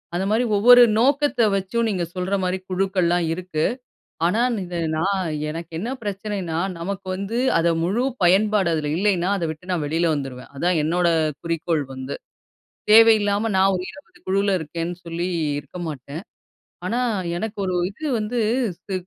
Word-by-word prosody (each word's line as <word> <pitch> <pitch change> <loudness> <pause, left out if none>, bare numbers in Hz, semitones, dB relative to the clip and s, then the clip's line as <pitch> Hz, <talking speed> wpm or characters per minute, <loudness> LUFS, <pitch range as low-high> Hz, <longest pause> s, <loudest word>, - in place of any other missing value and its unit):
அந்த 185 +2 0
மாரி 220 +3 +2
ஒவ்வொரு 245 +4 +8 0.2
நோக்கத்த 280 +1 +2
வச்சும், 195 +5 -1
நீங்க 185 -4 -1
சொல்ற 185 +2 -1
மாரி 185 +1 0
குழுக்கள்லாம் 185 -2 +1
இருக்கு. 175 -3 -3 0.6
ஆனா 210 +7 +2 0.2
இந்த 175 -1 -5 0.2
நான் 190 0 0 0.2
எனக்கு 165 +2 -6
என்ன 220 +7 -3
பிரச்சனைன்னா, 195 -4 -3 0.2
நமக்கு 195 +3 -5
வந்து 200 +5 -4 0.2
அத 170 - +2 0.2
முழு 205 +8 0 0.2
பயன்பாடு 195 +1 +3
அதில 150 -2 -1
இல்லைன்னா, 190 -2 +1
அதை 170 -3 -2
விட்டு 160 +4 -12
நான் 165 -4 0
வெளில 165 +3 +1
வந்துருவேன். 135 -3 -6
அதான் 175 +2 +1
என்னோட 175 +3 +1 0.4
குறிக்கோள் 165 -2 -1
வந்து. 130 +1 -5 0.8
தேவையில்லாம 220 -1 +5
நான் 195 +1 +4
ஒரு 180 - -4
20 290 - -16
குழுவுல 195 +1 +1
இருக்கேன்னு 165 +3 -4
சொல்லி, 170 +2 -3 0.3
இருக்க 180 - -11
மாட்டேன். 145 +3 -7 0.6
ஆனா, 240 +2 -1 0.4
எனக்கு 220 +3 -4
ஒரு 185 - -1 0.2
இது 295 +10 -5
வந்து 215 +3 -3 0.5
ஸி 195 - -5
185 Hz, 150 wpm, -22 LUFS, 170-205 Hz, 0.8 s, ஒவ்வொரு